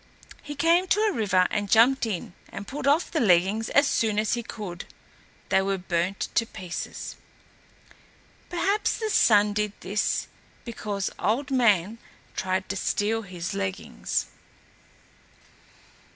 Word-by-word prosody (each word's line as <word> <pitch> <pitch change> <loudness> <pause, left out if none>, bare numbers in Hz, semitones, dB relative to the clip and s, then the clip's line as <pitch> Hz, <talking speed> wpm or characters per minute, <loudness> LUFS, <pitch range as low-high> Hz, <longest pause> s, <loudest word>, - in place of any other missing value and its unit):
He 290 0 -7
came 335 +5 +3
to 410 - +2
a 435 -1 +3
river 190 - +2
and 205 -1 -1
jumped 235 +3 +5
in 185 -4 -4 0.2
and 200 +1 -8
pulled 280 0 -4
off 295 +5 +3
the 320 - 0
leggings 200 - +3
as 285 - +4
soon 220 -6 +1
as 215 0 +1
he 240 - -1
could. 200 -6 -7 0.6
They 190 - +4
were 195 0 0
burnt 180 +1 -1
to 230 - +2
pieces. 180 -4 -6 1.3
Perhaps 400 +4 0
the 440 -1 -2
Sun 210 - +5
did 210 0 -1
this 205 +3 0 0.4
because 210 -4 -3
Old 255 +6 0
Man 225 -4 +3 0.4
tried 185 0 -1
to 195 - -2
steal 210 +3 0
his 180 -1 -6
leggings. 195 -1 -2
210 Hz, 135 wpm, -26 LUFS, 190-255 Hz, 1.3 s, jumped